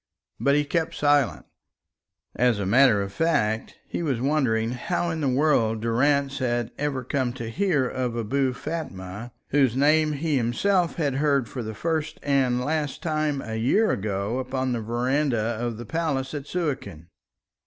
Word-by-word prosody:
But 140 0 +3
he 150 0 +2
kept 160 +2 -1
silent. 145 -3 +2 0.9
As 125 -2 +3
a 100 - -2
matter 110 -1 +5
of 100 0 -7
fact, 110 -8 0
he - - -3
was 140 -8 -1
wondering 120 -5 +1
how 170 +7 -1
in 160 -1 -3
the 140 - +1
world 125 -5 +2
Durrance 140 +5 +1
had 120 -2 -1
ever 140 -3 -1
come 130 -1 -1
to 115 -3 -6
hear 150 - +1
of 125 -2 -2
Abou 130 +4 0
Fatma, 120 - -6 0.2
whose 135 -4 +3
name 155 +2 +3
he 150 0 0
himself 170 +10 +1
had 145 -5 -1
heard 140 -4 +2
for 125 - -5
the 110 -1 -6
first 160 +3 -2
and 130 -3 +1
last 150 -1 -2
time 155 -4 0
a 110 0 -4
year 170 - +3
ago 100 +4 -2
upon 130 0 -2
the 120 -2 -1
verandah 120 -1 0
of 120 -2 -2
the 120 - -7
Palace 145 -3 -2
at 145 -1 -5
Suakin. 135 - -3
135 Hz, 165 wpm, -25 LUFS, 115-150 Hz, 0.9 s, matter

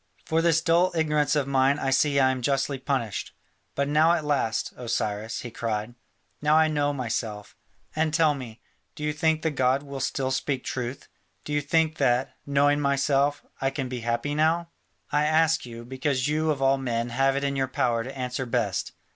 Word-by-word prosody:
For 160 +1 +1
this 165 -1 +3
dull 170 +2 +3
ignorance 150 -2 +1
of 145 -2 +1
mine 135 +1 +3
I 135 -2 -1
see 140 +1 +3
I 130 -1 +4
am 130 -1 -3
justly 135 +1 0
punished. 130 -6 -3 0.4
But 140 0 0
now 155 +3 +4
at 160 -3 -1
last, 140 -7 0
O 125 - -8
Cyrus," 110 -1 -2
he 120 - -7
cried, 110 0 -3 0.5
"now 150 +1 +4
I 160 0 +5
know 145 -1 +1
myself. 110 -5 -4 0.4
And 155 0 +1
tell 155 -1 +3
me, 120 -5 -9 0.3
do 150 - -7
you 150 0 0
think 160 +1 +1
the 160 - +1
god 130 0 +1
will 140 -1 -7
still 130 0 -1
speak 130 0 -1
truth? 125 +1 -5 0.4
Do 150 - -5
you 145 - +2
think 160 +2 +1
that, 130 -1 +1
knowing 145 +1 +3
myself, 140 0 +1 0.2
I 135 - +2
can 135 -2 -4
be 125 -1 -4
happy 120 +5 -1
now? 160 +3 +1 0.4
I 150 +1 +2
ask 160 -2 +2
you, 115 0 -9
because 130 +1 -1
you 155 +1 0
of 140 -3 0
all 135 0 +3
men 120 -2 -2
have 135 +3 +2
it 140 - -1
in 140 0 0
your 135 -1 0
power 125 -4 0
to 135 +3 -8
answer 125 0 -3
best. - - -1
140 Hz, 195 wpm, -26 LUFS, 125-150 Hz, 0.5 s, I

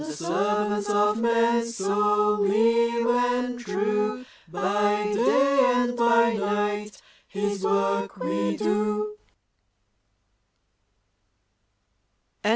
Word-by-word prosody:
The 155 - -6
servants 205 +5 -1
of 210 +1 +1
man 235 0 +2
so 210 -1 0
leal 230 +3 +2
and 245 0 -1
true, 210 +2 -2 0.2
By 205 +4 0
day 275 +5 +2 0.2
and 245 0 0
by 235 0 +3
night 205 -1 -2 0.3
his 200 -1 -3
work 65 - -1
we 100 0 -2
do. 210 0 -1
210 Hz, 80 wpm, -24 LUFS, 205-235 Hz, 0.3 s, by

